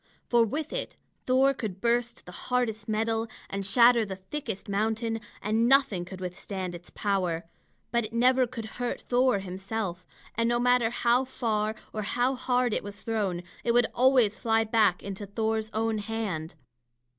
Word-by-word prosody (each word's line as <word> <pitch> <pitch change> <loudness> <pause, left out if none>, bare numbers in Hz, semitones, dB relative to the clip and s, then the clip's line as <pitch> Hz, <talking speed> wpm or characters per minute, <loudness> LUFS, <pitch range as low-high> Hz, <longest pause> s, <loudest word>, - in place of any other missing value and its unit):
For 240 -1 +5
with 295 +8 -3
it - - -3 0.3
Thor 265 +2 +4
could 215 -8 -5
burst 235 +1 0
the 180 - -10
hardest 225 0 -2
metal 225 +1 0 0.2
and 195 0 -2
shatter 235 +4 +6
the 195 -3 -5
thickest 195 +2 -6
mountain, 225 +2 -1 0.2
and 225 +3 +2
nothing 265 -10 +4
could 185 +1 -9
withstand 185 0 -5
its 175 0 -10
power. 180 -5 -1 0.5
But 235 -2 +1
it 215 - -7
never 250 +2 +4
could 235 -2 -6 0.2
hurt 245 - -1
Thor 250 -2 +2
himself; 190 0 -4 0.3
and 230 +1 +1
no 240 - +2
matter 245 -1 +3
how 240 +1 +2
far 220 -4 -1 0.2
or 215 - -2
how 245 +5 +1
hard 250 -2 +1
it - - -1
was 205 0 -8
thrown, 200 -6 -2 0.2
it 235 - +2
would 240 0 +5
always 250 -4 +4
fly 225 -1 +2
back 215 -5 +2
into 200 +1 -6
Thor's 220 +1 -1
own 220 0 0
hand. 205 -8 -4
225 Hz, 165 wpm, -28 LUFS, 200-245 Hz, 0.5 s, shatter